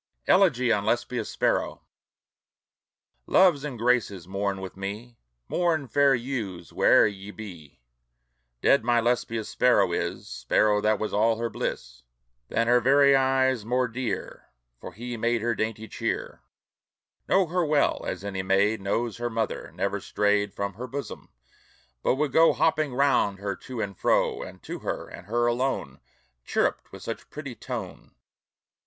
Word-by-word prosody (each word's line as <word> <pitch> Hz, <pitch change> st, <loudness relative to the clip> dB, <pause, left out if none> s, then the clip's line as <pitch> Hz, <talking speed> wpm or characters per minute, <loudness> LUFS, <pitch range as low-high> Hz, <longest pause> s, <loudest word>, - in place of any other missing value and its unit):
ELEGY 130 Hz, -11 st, +4 dB
ON 100 Hz, -, 0 dB
LESBIA'S 120 Hz, +3 st, -1 dB
SPARROW -, -, -1 dB, 1.4 s
Loves 175 Hz, -7 st, +4 dB
and 140 Hz, -5 st, -5 dB
Graces, 110 Hz, -7 st, 0 dB
mourn 100 Hz, 0 st, -2 dB
with 95 Hz, -1 st, -7 dB
me, 105 Hz, +5 st, -7 dB, 0.3 s
Mourn, 165 Hz, -5 st, 0 dB
fair 140 Hz, 0 st, +4 dB
youths, 115 Hz, -9 st, -5 dB
where'er -, -, +5 dB
ye 100 Hz, -1 st, -4 dB
be! 85 Hz, -, -11 dB, 0.8 s
Dead 140 Hz, -, +4 dB
my 120 Hz, 0 st, +3 dB
Lesbia's 115 Hz, -2 st, -1 dB
sparrow 125 Hz, 0 st, +3 dB
is, -, -, -3 dB
Sparrow 105 Hz, +12 st, +1 dB
that 110 Hz, +1 st, +2 dB
was 110 Hz, -, -3 dB
all 110 Hz, +2 st, +3 dB
her 115 Hz, -1 st, -3 dB
bliss, 60 Hz, +1 st, -5 dB, 0.5 s
Than 115 Hz, -, 0 dB
her 120 Hz, +1 st, +4 dB
very 140 Hz, +2 st, +5 dB
eyes 130 Hz, -3 st, +2 dB
more 125 Hz, +3 st, +1 dB
dear; 125 Hz, +1 st, -5 dB, 0.3 s
For -, -, -9 dB
he 120 Hz, +2 st, -6 dB
made 115 Hz, 0 st, 0 dB
her 120 Hz, 0 st, +1 dB
dainty 110 Hz, 0 st, -3 dB
cheer; -, -, -4 dB, 0.9 s
Knew 190 Hz, 0 st, +4 dB
her 175 Hz, +2 st, 0 dB
well, 150 Hz, -2 st, +1 dB
as 95 Hz, -, -4 dB
any 95 Hz, -2 st, -3 dB
maid 100 Hz, +3 st, +2 dB
Knows 115 Hz, +3 st, -1 dB
her 120 Hz, 0 st, -2 dB
mother; 115 Hz, -1 st, -3 dB
never -, -, -2 dB
strayed 105 Hz, -1 st, +1 dB
From 100 Hz, 0 st, -4 dB
her 120 Hz, +7 st, -7 dB
bosom, 140 Hz, +3 st, -7 dB, 0.7 s
but -, -, +2 dB
would 145 Hz, 0 st, -1 dB
go 165 Hz, +4 st, +5 dB
Hopping 155 Hz, -5 st, +1 dB
round 135 Hz, -7 st, +2 dB
her 100 Hz, 0 st, -3 dB
to 125 Hz, -2 st, -8 dB
and 100 Hz, -2 st, -4 dB
fro. -, -, +1 dB
And -, -, -10 dB
to -, -, -6 dB
her, -, -, -4 dB
and 90 Hz, -, -11 dB
her 120 Hz, +2 st, +1 dB
alone, 125 Hz, +3 st, -1 dB, 0.4 s
Chirruped -, -, -1 dB
with -, -, -11 dB
such -, -, -6 dB
pretty -, -, -7 dB
tone. -, -, -7 dB
115 Hz, 150 wpm, -26 LUFS, 100-130 Hz, 1.4 s, where'er